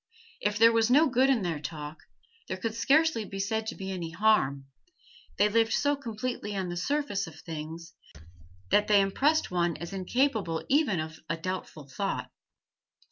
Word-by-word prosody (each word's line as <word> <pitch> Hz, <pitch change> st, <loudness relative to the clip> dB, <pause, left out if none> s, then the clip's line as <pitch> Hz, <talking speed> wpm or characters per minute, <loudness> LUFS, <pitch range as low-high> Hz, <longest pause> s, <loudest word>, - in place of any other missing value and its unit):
If 210 Hz, 0 st, 0 dB
there 230 Hz, +1 st, +7 dB
was 225 Hz, 0 st, +2 dB
no 290 Hz, +6 st, +6 dB
good 260 Hz, +1 st, +3 dB
in 245 Hz, -7 st, +2 dB
their 165 Hz, -4 st, -2 dB
talk, 150 Hz, 0 st, -7 dB, 0.5 s
there -, -, -3 dB
could 220 Hz, +3 st, -3 dB
scarcely 285 Hz, +1 st, +3 dB
be 195 Hz, -1 st, -7 dB
said 220 Hz, +3 st, -1 dB
to -, -, -4 dB
be 195 Hz, -1 st, -5 dB
any 175 Hz, -3 st, -4 dB
harm; 165 Hz, -8 st, +2 dB, 0.7 s
they 205 Hz, -, +5 dB
lived 225 Hz, +1 st, +2 dB
so 290 Hz, 0 st, +2 dB
completely 235 Hz, -4 st, -4 dB
on 190 Hz, -2 st, -2 dB
the 175 Hz, -, -4 dB
surface 205 Hz, -, -1 dB
of 160 Hz, -1 st, -12 dB
things 165 Hz, +1 st, -7 dB, 0.8 s
that 210 Hz, -, +4 dB
they 210 Hz, -1 st, +5 dB
impressed 275 Hz, +11 st, +2 dB
one 175 Hz, -2 st, 0 dB
as 170 Hz, +3 st, -7 dB
incapable 195 Hz, -3 st, 0 dB
even 270 Hz, -, +3 dB
of 155 Hz, 0 st, -5 dB
a 165 Hz, -, -1 dB
doubtful 165 Hz, -4 st, -5 dB
thought. 195 Hz, +9 st, -3 dB
200 Hz, 170 wpm, -28 LUFS, 170-230 Hz, 0.8 s, there